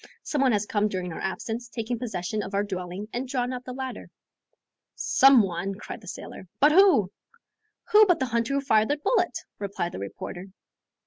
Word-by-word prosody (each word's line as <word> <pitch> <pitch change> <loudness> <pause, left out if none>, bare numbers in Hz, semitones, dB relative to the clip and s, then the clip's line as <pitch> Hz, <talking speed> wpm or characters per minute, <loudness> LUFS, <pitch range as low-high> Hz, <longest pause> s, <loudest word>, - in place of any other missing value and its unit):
Some 290 - -1
one 265 -2 +4
has 210 -1 +1
come 210 0 +1
during 185 -4 -4
our - - -7
absence, 225 +5 -4
taken 235 0 -4
possession 215 -3 -3
of 195 0 -5
our 200 - +2
dwelling 185 0 -5
and 250 +2 -3
drawn 250 -1 -1
up 250 0 -6
the 255 - -6
ladder." 260 0 -6 0.9
"Some 270 -4 +5
one," 190 +1 -3
cried 215 +3 -8
the 200 - -15
sailor. 190 - -8
"But 295 +2 +6
who?" 335 - +5 0.8
"Who 425 0 +8
but 355 - +4
the 260 - +1
hunter 235 +2 -1
who 280 - +1
fired 220 -5 +3
the 290 - 0
bullet?" 360 +3 +1 0.2
replied 195 -4 -3
the - - -7
reporter. 175 - -7
225 Hz, 190 wpm, -26 LUFS, 195-265 Hz, 0.9 s, Who